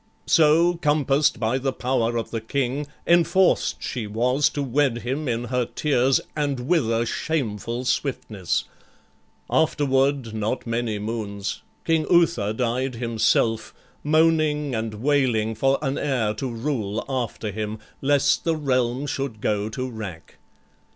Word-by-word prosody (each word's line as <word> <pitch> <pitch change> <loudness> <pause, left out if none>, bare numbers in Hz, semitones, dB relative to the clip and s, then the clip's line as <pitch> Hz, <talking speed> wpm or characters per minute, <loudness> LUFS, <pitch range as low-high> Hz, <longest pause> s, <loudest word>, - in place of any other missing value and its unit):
So, 165 +2 +4
compass'd 145 -1 +2
by 115 +4 0
the 135 +1 -1
power 120 -2 0
of 115 - -4
the 115 - -3
King, 135 +4 -2 0.2
Enforced 175 +2 +3
she 115 -4 -3
was 125 +7 +2
to 145 - -3
wed 130 -2 +1
him 135 +5 -2
in 120 -1 -1
her 125 +1 0
tears, 135 -1 +2 0.2
And 145 -4 -1
with 155 -10 +2
a 115 +1 +1
shameful 120 -4 -2
swiftness: 110 - -1 0.8
afterward, 135 -5 +1
Not 110 +3 -2
many 115 -2 -1
moons, 105 -2 -4 0.2
King 160 -2 +1
Uther 170 - +3
died 125 +3 -1
himself, 115 -1 +1 0.3
Moaning 155 -2 +2
and 110 -1 -3
wailing 120 -3 +1
for 135 +5 +2
an 135 -1 -1
heir 125 -7 0
to 130 +5 -4
rule 115 -4 -3
After 120 -5 -3
him, 105 +1 -4 0.2
lest 140 0 +2
the 165 -1 +1
realm 130 -3 0
should 135 -6 -3
go 105 0 -1
to 130 +4 -4
wrack. 105 -9 -8
125 Hz, 135 wpm, -24 LUFS, 115-145 Hz, 0.8 s, So